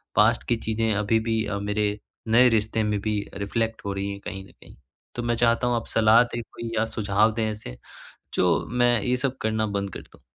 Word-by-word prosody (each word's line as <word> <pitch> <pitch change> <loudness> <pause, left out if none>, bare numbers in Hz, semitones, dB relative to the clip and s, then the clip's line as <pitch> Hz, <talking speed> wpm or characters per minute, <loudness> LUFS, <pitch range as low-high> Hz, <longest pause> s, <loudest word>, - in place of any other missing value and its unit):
Past 115 +2 +4
की 120 - +3
चीज़ें 110 0 +1
अभी 105 +2 +2
भी 110 -1 0
अ, 100 -1 -3
मेरे 105 0 -1 0.3
नए 120 +3 +6
रिश्ते 110 0 +1
में 105 -1 0
भी 105 -1 -1 0.2
रिफ्लेक्ट 110 +3 -2
हो 100 - -2
रही 100 +1 -3
हैं 100 - -7
कहीं 95 -1 -6
न - - -18
कहीं। - - -17 0.4
तो 120 - -3
मैं 120 0 0
चाहता 120 +1 +2
हूँ 120 - +1
आप 115 - -2
सलाह 110 +1 +5
दें 120 0 -5
कोई 115 +1 -8
या 115 - +2
सुझाव 105 0 +1
दें? 110 -1 -1
ऐसे 60 - -8 0.6
जो - - +2
मैं 120 -2 +3
ये 125 +3 0
सब 130 0 -2
करना 110 0 0
बंद 100 0 -1
कर - - -6
दूँ। - - -20
110 Hz, 220 wpm, -25 LUFS, 105-115 Hz, 0.6 s, नए